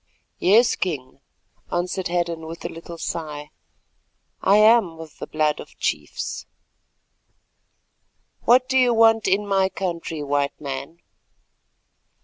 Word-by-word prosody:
"Yes, 225 +6 +4
King," 135 -7 -4 0.5
answered 180 +1 -1
Hadden, 170 -2 -2
with 165 +1 -8
a - - -2
little 165 +1 -9
sigh, 150 -3 -5 0.9
"I 200 +2 +5
am 215 -6 +4
of 160 -2 -11
the - - -6
blood 155 -1 0
of - - -11
chiefs." - - -3 2.0
"What 255 +2 +5
do 265 0 +3
you 245 -2 +4
want 225 -1 +4
in 195 +2 +2
my 195 -1 +2
country, 170 -5 -4
White 140 0 -1
Man?" 140 +3 -6
175 Hz, 120 wpm, -23 LUFS, 155-205 Hz, 2.0 s, I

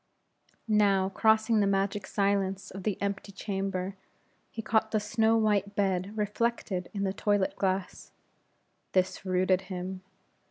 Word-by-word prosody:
Now, 200 -3 +3
crossing 220 +2 +3
the 200 - +3
magic 195 0 0
silence 195 -1 0
of 195 - -7
the 200 0 -2
empty 200 0 -3
chamber, 195 -1 -3 0.5
he 225 - -6
caught 220 0 +2
the 220 - +1
snow 220 +2 +2
white 205 -2 +1
bed 195 +1 0
reflected 210 -3 -1
in 200 -1 -3
the 190 -1 0
toilet 205 -1 +1
glass. 190 -1 -2 0.8
This 185 +1 +1
rooted 185 0 +2
him. 185 0 -5
200 Hz, 130 wpm, -29 LUFS, 190-210 Hz, 0.8 s, Now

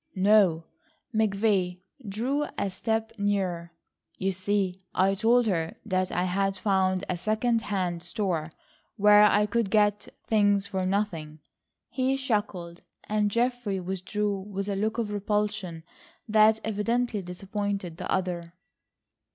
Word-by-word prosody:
"No!" 190 -4 +4 0.5
McVay 200 -4 +1 0.3
drew 260 +9 -1
a 200 - -1
step 220 +3 -1
nearer. 185 -4 -1 0.5
"You 195 0 0
see 190 0 -1
I 190 +1 +3
told 230 +4 +3
her 165 -6 -1
that 185 -2 0
I 180 - 0
had 195 +1 0
found 190 -2 +1
a 185 - -1
second 220 +5 0
hand 185 -5 -2
store 175 -3 -2 0.5
where 210 0 +7
I 210 0 +5
could 225 -1 0
get 210 0 +2 0.2
things 205 -2 +3
for 190 -2 -2
nothing." 175 -6 -2 0.5
He 265 +1 0
chuckled, 205 -9 -2 0.2
and 210 -1 0
Geoffrey 235 -3 0
withdrew 195 +2 -2
with 195 0 -5
a 200 - -1
look 220 +3 -1
of 225 -3 -2
repulsion 205 -4 -2 0.4
that 215 0 +5
evidently 220 +1 0
disappointed 195 -1 -4
the - - -5
other. 175 -2 -2
200 Hz, 125 wpm, -27 LUFS, 185-215 Hz, 0.5 s, where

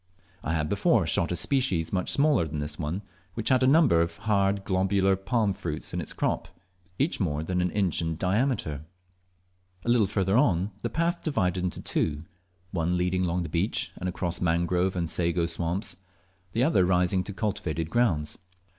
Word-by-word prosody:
I 80 - -1
had 75 -2 0
before - - +2
shot 85 - +1
a - - 0
species 100 - +1
much 90 -1 0
smaller 140 - +3
than 75 0 -5
this 75 0 -3
one, 85 +6 -3 0.3
which 115 - -2
had 130 -1 +4
a 130 - +4
number 140 - +5
of 85 0 -2
hard 100 -2 +1
globular 95 0 +2
palm 100 +2 0
fruits 85 -6 -4
in - - -1
its - - -4
crop, - - -1 0.5
each 145 +6 0
more 75 -6 -1
than 90 +2 -1
an 90 - +1
inch 95 -4 0
in 80 -1 -2
diameter. 95 - 0 1.0
A - - -1
little 120 -4 +4
further 100 - +2
the - - -2
path 170 +1 0
divided 90 - 0
into 90 - -3
two, 75 -1 -1 0.5
one 85 0 0
leading 90 +1 +1
along 90 +1 0
the - - -4
beach, 90 +5 -1
and 90 - -3
across 90 0 -3
mangrove 90 +2 +1
and 85 -2 -1
sago 85 0 +1
swamps 85 +3 -2 0.6
the 115 - +2
other 130 - +4
rising 90 +1 +2
to - - -6
cultivated 90 -6 -3
grounds. 85 -12 +1
90 Hz, 175 wpm, -27 LUFS, 85-105 Hz, 1.0 s, number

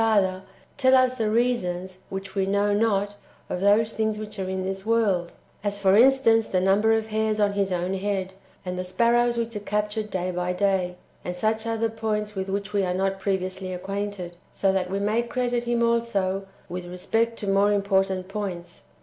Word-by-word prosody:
Father, 195 -4 +2 0.4
tell 260 0 +5
us 255 -1 +4
the 225 -4 -1
reasons 190 -6 0
(which 195 0 -6
we 190 -1 0
know 200 +1 +2
not) 205 -1 +1 0.3
of 180 - -2
those 215 +3 +3
things 220 -1 0
which 215 -1 -7
are 190 -1 -2
in 190 0 -2
this 190 0 -4
world, 205 -6 +1 0.2
— - - -34
as, 205 -1 -1
for 195 -1 +4
instance, 230 -2 +5
the 185 - 0
numher 200 +4 +3
of 220 0 -4
hairs 215 0 0
on 205 -1 +2
his 200 -1 0
own 180 +1 -1
head, 190 -1 -2 0.3
and 180 0 -3
the - - -1
sparrows 235 +5 +2
which 230 -1 -2
are - - -2
cap 210 0 -1
tured 215 0 -3
day 185 -2 -2
by 180 0 -1
day, 185 -2 +1 0.3
and 180 - -4
such 220 +4 0
other 225 0 0
points 215 -1 -2
with 190 -1 -4
which 200 +1 -3
we 200 - +2
are 180 -1 -1
not 195 +1 0
previously 190 -1 -2
acquainted, 195 -1 -4
— - - -34
so 195 -1 +4
that 185 -1 0
we 195 - -1
may 210 +3 +1
credit 240 0 -1
him 235 0 +1
also 200 -5 0 0.2
with 180 0 -5
respect 225 +6 -1
to - - -6
more 200 +1 +3
important 195 -2 +1
points. 195 -4 -5
200 Hz, 200 wpm, -25 LUFS, 190-220 Hz, 0.4 s, tell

